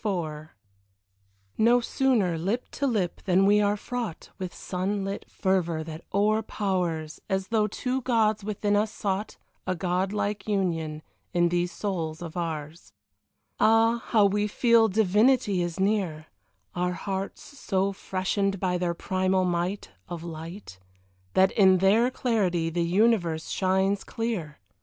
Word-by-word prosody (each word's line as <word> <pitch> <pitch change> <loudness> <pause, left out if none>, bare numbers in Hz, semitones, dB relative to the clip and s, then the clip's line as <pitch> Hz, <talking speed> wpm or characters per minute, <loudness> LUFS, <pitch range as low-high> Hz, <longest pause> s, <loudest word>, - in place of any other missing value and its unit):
XXIV 160 -7 -3 1.1
No 235 +3 +5
sooner 235 -7 +1
lip 195 +10 -2
to 280 - -1
lip, 205 -8 -1
than 190 0 +4
we 205 +1 +5
are 205 0 +2
fraught 235 -5 -5
With 185 -2 -4
sun 195 +2 -3
lit 195 +1 -5
fervour 175 -4 0
that 160 +1 -8
o'erpowers, 195 -6 0
As 190 0 -1
though 220 -2 +2
two 255 +5 -2
gods 220 -4 +1
within 205 0 0
us 210 +1 +1
sought 205 0 -3 0.3
A 185 - 0
god 180 +2 -1
like 205 -1 -2
union 165 -6 -1 0.3
in 175 0 +4
these 175 0 0
souls 170 -5 -3
of 165 -2 -8
ours; 160 -1 -5 0.7
Ah, 225 +1 +4
how 215 -3 +4
we 205 +1 +1
feel 230 +1 +4
divinity 210 0 +3
is 175 +1 -3
near 190 -6 0 0.5
Our 180 0 -1
hearts 195 +2 -4
so 195 -8 -2
freshened 195 +1 -1
by 180 -1 0
their 175 -1 -1
primal 185 +1 0
might 175 - -2 0.2
Of 170 -2 -6
light, 165 - -8 0.6
That 190 0 +5
in 190 -3 +5
their 205 +6 +4
clarity 185 -10 0
the 170 +1 -1
universe 175 -3 +2
shines 190 +1 +1
clear. 215 -10 -4
190 Hz, 140 wpm, -27 LUFS, 175-210 Hz, 1.1 s, No